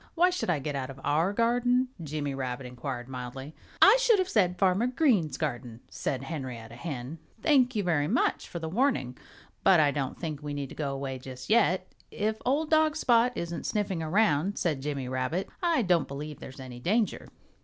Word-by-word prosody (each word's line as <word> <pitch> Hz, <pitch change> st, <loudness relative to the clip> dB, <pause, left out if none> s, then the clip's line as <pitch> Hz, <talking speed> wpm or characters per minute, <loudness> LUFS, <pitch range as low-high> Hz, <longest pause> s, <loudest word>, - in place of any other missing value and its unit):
"Why 360 Hz, +2 st, +4 dB
should 360 Hz, -, -2 dB
I 175 Hz, -, +3 dB
get 145 Hz, +1 st, -4 dB
out 135 Hz, -1 st, -3 dB
of 135 Hz, 0 st, -9 dB
our 155 Hz, +6 st, +2 dB
garden?" 245 Hz, +3 st, +2 dB
Jimmy 145 Hz, -2 st, -3 dB
Rabbit 130 Hz, -1 st, -4 dB
inquired 125 Hz, 0 st, -5 dB
mildly. 130 Hz, +3 st, -7 dB, 0.3 s
"I -, -, +8 dB
should 470 Hz, -3 st, +5 dB
have 370 Hz, -1 st, +1 dB
said, 180 Hz, -, +2 dB
'Farmer 190 Hz, +5 st, +3 dB
Green's 230 Hz, -, +2 dB
garden,'" 120 Hz, -5 st, -4 dB
said 135 Hz, -1 st, -3 dB
Henrietta 130 Hz, -6 st, -6 dB
Hen. 140 Hz, +1 st, -6 dB, 0.2 s
"Thank 260 Hz, -4 st, +4 dB
you 210 Hz, -, +1 dB
very 160 Hz, -5 st, +1 dB
much -, -, +1 dB
for -, -, -6 dB
the 165 Hz, -1 st, -4 dB
warning; 185 Hz, -, 0 dB, 0.5 s
but 190 Hz, -3 st, +6 dB
I 145 Hz, -2 st, +4 dB
don't 140 Hz, -2 st, -3 dB
think 155 Hz, -4 st, -4 dB
we 145 Hz, -1 st, -5 dB
need 140 Hz, -2 st, -5 dB
go 145 Hz, -3 st, -2 dB
away 135 Hz, -1 st, -4 dB
just 130 Hz, +4 st, -8 dB
yet 190 Hz, -5 st, +3 dB, 0.2 s
if 215 Hz, +1 st, -2 dB
old 300 Hz, +4 st, +1 dB
dog 310 Hz, -1 st, +4 dB
Spot 245 Hz, -5 st, +3 dB
isn't 170 Hz, -1 st, -4 dB
sniffing 195 Hz, -5 st, -1 dB
around," 170 Hz, +1 st, +2 dB
said 155 Hz, -7 st, 0 dB
Jimmy 140 Hz, -2 st, -3 dB
Rabbit. 130 Hz, +8 st, -2 dB
"I 335 Hz, -8 st, +2 dB
don't 175 Hz, -5 st, +2 dB
believe 145 Hz, +1 st, -7 dB
there's 130 Hz, +1 st, -10 dB
any 130 Hz, -2 st, -8 dB
danger." 210 Hz, -, 0 dB
160 Hz, 185 wpm, -28 LUFS, 135-220 Hz, 0.5 s, I